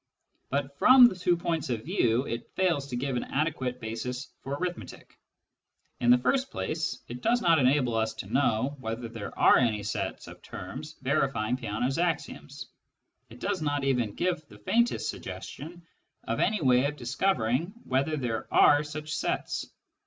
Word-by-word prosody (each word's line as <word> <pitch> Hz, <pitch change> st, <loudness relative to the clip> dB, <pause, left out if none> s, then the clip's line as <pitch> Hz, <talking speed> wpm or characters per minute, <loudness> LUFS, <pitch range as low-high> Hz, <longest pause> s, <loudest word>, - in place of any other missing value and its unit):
But 140 Hz, 0 st, -2 dB
from 255 Hz, -4 st, +8 dB
two 180 Hz, -1 st, +1 dB
points 165 Hz, -4 st, -2 dB
of 115 Hz, -3 st, -2 dB
view 130 Hz, -, +1 dB
it 115 Hz, 0 st, -5 dB
fails 170 Hz, -7 st, +1 dB
to 130 Hz, -, -5 dB
give 130 Hz, +1 st, -2 dB
an 120 Hz, -, -1 dB
adequate 135 Hz, -4 st, -2 dB
basis 125 Hz, +4 st, -5 dB
for 140 Hz, +1 st, -4 dB
arithmetic. 180 Hz, +3 st, -6 dB, 0.8 s
In 120 Hz, -, +2 dB
the 125 Hz, -, +8 dB
first 265 Hz, -, +1 dB
place, 155 Hz, -5 st, -3 dB
it 120 Hz, +1 st, -7 dB
does 240 Hz, -, +2 dB
not 165 Hz, -5 st, +4 dB
enable 130 Hz, -2 st, +3 dB
us 110 Hz, 0 st, 0 dB
to -, -, -6 dB
know 130 Hz, +1 st, +1 dB
whether 115 Hz, 0 st, -4 dB
there 115 Hz, -3 st, -8 dB
are -, -, +6 dB
any 110 Hz, -5 st, +1 dB
sets 105 Hz, -, -4 dB
of -, -, -12 dB
terms -, -, -8 dB
verifying 110 Hz, +3 st, +1 dB
Peano's 125 Hz, +4 st, -2 dB
axioms; 160 Hz, -4 st, -3 dB, 0.6 s
it 120 Hz, -, -13 dB
does 195 Hz, +2 st, -2 dB
not 145 Hz, -2 st, -1 dB
even 125 Hz, -6 st, 0 dB
give 180 Hz, -3 st, -1 dB
the 105 Hz, -, -14 dB
faintest 235 Hz, -, +1 dB
suggestion 170 Hz, +4 st, -7 dB, 0.4 s
of 115 Hz, -, -2 dB
any 210 Hz, -2 st, +1 dB
way 130 Hz, -1 st, +4 dB
of 145 Hz, +1 st, -1 dB
discovering 130 Hz, -, 0 dB
whether 140 Hz, +4 st, 0 dB
there 120 Hz, -5 st, -3 dB
are 145 Hz, 0 st, +6 dB
such 155 Hz, +1 st, -6 dB
sets. -, -, -2 dB
135 Hz, 160 wpm, -28 LUFS, 120-160 Hz, 0.8 s, from